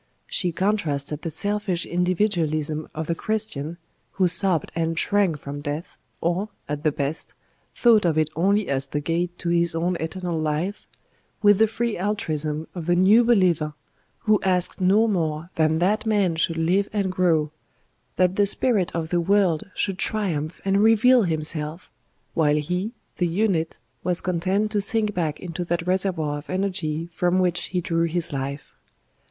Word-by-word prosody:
She 180 Hz, -3 st, -1 dB
contrasted 155 Hz, -7 st, -1 dB
the 165 Hz, -, -3 dB
selfish 200 Hz, 0 st, -1 dB
individualism 165 Hz, -4 st, 0 dB
of 160 Hz, +1 st, -3 dB
the 170 Hz, -, -1 dB
Christian, 170 Hz, -6 st, -2 dB, 0.4 s
who 185 Hz, -2 st, +2 dB
sobbed 175 Hz, -2 st, +2 dB
and 165 Hz, -1 st, -1 dB
shrank 195 Hz, -4 st, +2 dB
from 145 Hz, 0 st, -7 dB
death, 150 Hz, +3 st, -5 dB, 0.3 s
or, 175 Hz, +5 st, 0 dB, 0.2 s
at 150 Hz, +1 st, -4 dB
the 155 Hz, -, +3 dB
best, 145 Hz, +2 st, -4 dB, 0.4 s
thought 230 Hz, -3 st, +5 dB
of 165 Hz, -3 st, +1 dB
it 155 Hz, -1 st, +1 dB
only 200 Hz, +5 st, +2 dB
as 135 Hz, 0 st, -1 dB
the 145 Hz, -, -2 dB
gate 170 Hz, +3 st, -2 dB
to 175 Hz, -, -3 dB
his 170 Hz, -1 st, +2 dB
own 175 Hz, +2 st, 0 dB
eternal 170 Hz, +1 st, -3 dB
life, 155 Hz, +6 st, -2 dB, 0.6 s
with 205 Hz, -1 st, +6 dB
the 220 Hz, -, +5 dB
free 230 Hz, +1 st, -2 dB
altruism 160 Hz, -7 st, -2 dB
of 175 Hz, -3 st, -6 dB
the 175 Hz, -, +3 dB
New 200 Hz, +6 st, +6 dB
Believer 180 Hz, -10 st, +2 dB, 0.5 s
who 215 Hz, -2 st, +3 dB
asked 185 Hz, 0 st, +1 dB
no 200 Hz, +5 st, +4 dB
more 165 Hz, -4 st, -2 dB
than 160 Hz, 0 st, +2 dB
that 205 Hz, +6 st, +1 dB
Man 200 Hz, -6 st, +2 dB
should 165 Hz, 0 st, 0 dB
live 180 Hz, +5 st, +1 dB
and 200 Hz, -3 st, -1 dB
grow, 165 Hz, -5 st, +1 dB, 0.6 s
that 185 Hz, 0 st, +2 dB
the 205 Hz, -1 st, +4 dB
Spirit 205 Hz, -4 st, +2 dB
of 160 Hz, -1 st, -2 dB
the 175 Hz, 0 st, +1 dB
World 190 Hz, -2 st, +2 dB
should 195 Hz, -1 st, -1 dB
triumph 175 Hz, -9 st, -1 dB
and 195 Hz, +1 st, +2 dB
reveal 230 Hz, +3 st, +5 dB
Himself, 155 Hz, 0 st, -3 dB, 0.4 s
while 150 Hz, -3 st, +3 dB
he, 180 Hz, +9 st, -2 dB, 0.2 s
the 175 Hz, -, +1 dB
unit, 170 Hz, -3 st, 0 dB, 0.3 s
was 180 Hz, -1 st, +1 dB
content 185 Hz, +4 st, 0 dB
to 210 Hz, -2 st, +1 dB
sink 210 Hz, +1 st, 0 dB
back 160 Hz, -5 st, -2 dB
into 175 Hz, -1 st, -5 dB
that 170 Hz, 0 st, -2 dB
reservoir 180 Hz, -5 st, 0 dB
of 145 Hz, -, -15 dB
energy 175 Hz, -4 st, -2 dB
from 180 Hz, +2 st, +1 dB
which 180 Hz, -2 st, +1 dB
he 180 Hz, -1 st, -2 dB
drew 165 Hz, 0 st, 0 dB
his 165 Hz, -2 st, -2 dB
life. 140 Hz, +1 st, -5 dB
175 Hz, 165 wpm, -24 LUFS, 160-200 Hz, 0.6 s, with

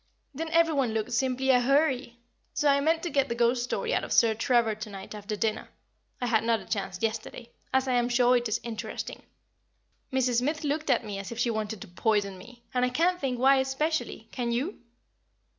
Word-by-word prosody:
Then 320 Hz, +4 st, -4 dB
every 330 Hz, 0 st, +3 dB
one 255 Hz, -6 st, 0 dB
looked 220 Hz, +1 st, -2 dB
simply 260 Hz, +2 st, 0 dB
ahuri. 260 Hz, 0 st, +2 dB, 0.4 s
So 295 Hz, -, +1 dB
I 280 Hz, 0 st, +5 dB
mean 320 Hz, +3 st, +2 dB
to 345 Hz, -, -3 dB
get 275 Hz, -1 st, +1 dB
the 235 Hz, -, -1 dB
ghost 240 Hz, +1 st, +2 dB
story 245 Hz, -, -2 dB
out -, -, +1 dB
of -, -, -6 dB
Sir 230 Hz, -2 st, +5 dB
Trevor 230 Hz, -1 st, +2 dB
to 215 Hz, 0 st, -7 dB
night 195 Hz, 0 st, -9 dB
after 210 Hz, 0 st, -5 dB
dinner 220 Hz, +1 st, -2 dB, 0.5 s
I 250 Hz, -, -1 dB
had 225 Hz, -2 st, +2 dB
not 230 Hz, -1 st, +2 dB
a -, -, -12 dB
chance 195 Hz, -4 st, -3 dB
yesterday 225 Hz, +2 st, -3 dB, 0.2 s
as 265 Hz, 0 st, +2 dB
I 255 Hz, -, +1 dB
am 240 Hz, 0 st, +2 dB
sure 245 Hz, 0 st, +4 dB
it 240 Hz, -1 st, +1 dB
is 215 Hz, -, 0 dB
interesting. 225 Hz, -3 st, -5 dB, 0.9 s
Mrs. 255 Hz, -2 st, +1 dB
Smith 300 Hz, +5 st, -1 dB
looked 300 Hz, +1 st, -1 dB
at 235 Hz, -, +2 dB
me 200 Hz, -2 st, -5 dB
as 195 Hz, -, -7 dB
if 235 Hz, -, -6 dB
she 240 Hz, 0 st, +1 dB
wanted 215 Hz, -2 st, -3 dB
to -, -, -8 dB
poison 200 Hz, +1 st, 0 dB
me, 240 Hz, +5 st, -14 dB
and 250 Hz, 0 st, +1 dB
I 250 Hz, -, +3 dB
can't 350 Hz, +8 st, +1 dB
think 255 Hz, -2 st, -1 dB
why 265 Hz, +2 st, +5 dB
specially, 270 Hz, -3 st, -2 dB
can 240 Hz, -2 st, -2 dB
you? 270 Hz, -, -2 dB
245 Hz, 210 wpm, -28 LUFS, 220-270 Hz, 0.9 s, I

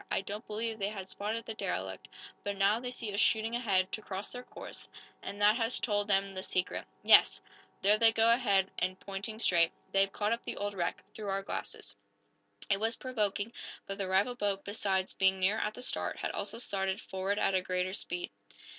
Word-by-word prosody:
"I -, -, +1 dB
don't 205 Hz, +4 st, -6 dB
believe 220 Hz, +1 st, -3 dB
they 195 Hz, -, 0 dB
had 195 Hz, -3 st, -6 dB
spotted 220 Hz, +3 st, -3 dB
the 225 Hz, -, -4 dB
derelict, 95 Hz, -, -4 dB, 0.4 s
but 200 Hz, -1 st, -3 dB
now 200 Hz, +3 st, +4 dB
they 250 Hz, 0 st, -4 dB
see 230 Hz, -4 st, -4 dB
us 200 Hz, -, -1 dB
shooting 225 Hz, +1 st, +3 dB
ahead, 195 Hz, -6 st, +2 dB
to 215 Hz, -, -3 dB
cross 195 Hz, -1 st, -5 dB
their 245 Hz, -, -6 dB
course, -, -, -9 dB, 0.3 s
and 200 Hz, -, -6 dB
that 210 Hz, +2 st, +5 dB
has 230 Hz, 0 st, 0 dB
told 205 Hz, -3 st, 0 dB
them 195 Hz, -1 st, +2 dB
the 185 Hz, -, -4 dB
secret. 185 Hz, -1 st, -1 dB, 0.2 s
Yes! -, -, +7 dB, 0.4 s
There 210 Hz, +2 st, +5 dB
they 225 Hz, -1 st, +7 dB
go 225 Hz, +1 st, +4 dB
ahead, 200 Hz, -6 st, +3 dB
and 185 Hz, +1 st, -1 dB
pointing 200 Hz, +3 st, -5 dB
straight. 170 Hz, -7 st, +4 dB, 0.2 s
They've 195 Hz, 0 st, +3 dB
caught 210 Hz, +1 st, -1 dB
up 235 Hz, -, -3 dB
the -, -, -4 dB
old 205 Hz, 0 st, -2 dB
wreck 175 Hz, -3 st, -2 dB
through 210 Hz, -2 st, -5 dB
our 195 Hz, 0 st, -1 dB
glasses!" 100 Hz, -, -5 dB, 0.7 s
It 195 Hz, -, +2 dB
was 225 Hz, +2 st, +1 dB
provoking, 215 Hz, -3 st, -1 dB, 0.3 s
but 195 Hz, +1 st, -5 dB
the 195 Hz, -, -1 dB
rival 195 Hz, +6 st, +2 dB
boat, 205 Hz, -4 st, -1 dB
besides 195 Hz, -2 st, 0 dB
being 190 Hz, 0 st, +3 dB
nearer 200 Hz, +4 st, +2 dB
at 210 Hz, -, -2 dB
the 250 Hz, -, -5 dB
start, -, -, -1 dB
had -, -, -2 dB
also 225 Hz, -, -3 dB
started 195 Hz, -4 st, -1 dB
forward 190 Hz, +2 st, -2 dB
at 190 Hz, -3 st, +2 dB
greater 185 Hz, 0 st, 0 dB
speed. 360 Hz, -, -4 dB
205 Hz, 200 wpm, -32 LUFS, 190-225 Hz, 0.7 s, Yes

